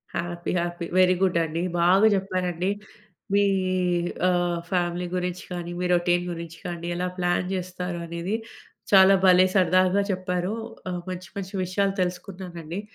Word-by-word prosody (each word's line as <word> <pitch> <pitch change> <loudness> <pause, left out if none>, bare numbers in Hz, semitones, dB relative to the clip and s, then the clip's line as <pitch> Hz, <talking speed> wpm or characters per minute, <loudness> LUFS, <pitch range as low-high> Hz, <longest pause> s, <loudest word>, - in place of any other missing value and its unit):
Happy 175 0 -3
happy. 175 0 -3
Very 185 0 +5
good 185 -3 +3
అండి. 160 +2 -3 0.2
బాగా 190 +5 +5
చెప్పారండి. 185 -2 -1 0.6
మీ 205 0 +5 0.9
ఆహ్, 175 -1 +1
ఫ్యామిలీ 175 -1 0
గురించి 180 0 -3
గానీ 175 -1 -5
మీ 180 - -1
రొటీన్ 175 0 +2
గురించి 165 -1 -7
గానీ 170 -1 -5
ఎలా 180 +1 -1
ప్లాన్ 175 0 0
జేస్తారు 180 -1 -4
అనేది. 170 +5 -3 0.6
చాలా 195 -1 +8
భలే 185 0 +7
సరదాగా 185 +2 +4
చెప్పారు. 185 +1 -2 0.4
ఆహ్, 180 -1 -3
మంచి 185 -1 -6
మంచి 195 0 -5
విషయాలు 195 +2 0
తెలుసుకున్నానండి 180 -1 -5
180 Hz, 135 wpm, -25 LUFS, 175-185 Hz, 0.9 s, చాలా